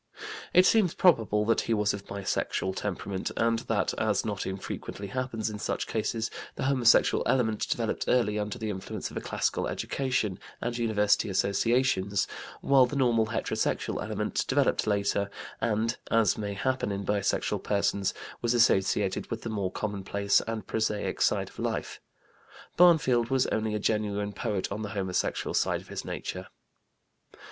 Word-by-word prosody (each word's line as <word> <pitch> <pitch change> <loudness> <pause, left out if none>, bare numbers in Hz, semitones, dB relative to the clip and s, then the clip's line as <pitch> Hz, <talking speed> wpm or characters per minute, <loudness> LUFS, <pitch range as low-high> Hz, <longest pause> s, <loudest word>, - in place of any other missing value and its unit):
It 180 - +6
seems 205 -6 +4
probable 110 - +3
that 115 - +3
he 115 - 0
was 105 0 +1
of 100 0 -7
bisexual 95 -1 -2
temperament, 95 -1 -3
and 115 0 +2
that, 115 -2 0
as 110 -1 +1
not 105 -3 -3
infrequently 95 +1 -5
happens 120 -2 -2
in 105 -1 -4
such - - -2
cases, 110 +1 -2 0.2
the - - -4
homosexual 130 -3 +4
element 110 -5 +1
developed - - -1
early 105 -4 +2
under 105 +4 -3
the 110 -2 -3
influence 95 -1 -5
of - - -7
a - - -2
classical - - -1
education 130 -8 -1 0.2
and 120 0 -3
university 105 -3 +2
associations, 100 0 +1 0.3
while 135 -2 +5
the 145 - -5
normal 120 -5 +3
heterosexual 110 - -1
element - - -1
developed - - +2
later 100 -1 +1 0.3
and, 115 +1 0
as 115 -4 +3
may 100 -2 -4
happen 130 0 -1
in 100 0 -3
bisexual 100 0 0
persons, 100 -1 +1 0.3
was 120 0 +1
associated 95 -4 +2
with 115 -1 -4
the 115 - -4
more 100 -4 -2
commonplace 100 -1 0
and 110 -3 -3
prosaic 110 -1 -1
side - - +2
of - - -15
life. - - -3 0.7
Barnfield 135 -9 +5
was 130 -1 +2
only 110 -1 0
a - - -1
genuine 105 -1 -1
poet 100 -2 -2
on 105 +2 -3
the 105 - -4
homosexual 95 -2 -1
side - - +1
of - - -18
his - - -5
nature. - - -5
110 Hz, 155 wpm, -28 LUFS, 100-120 Hz, 0.7 s, It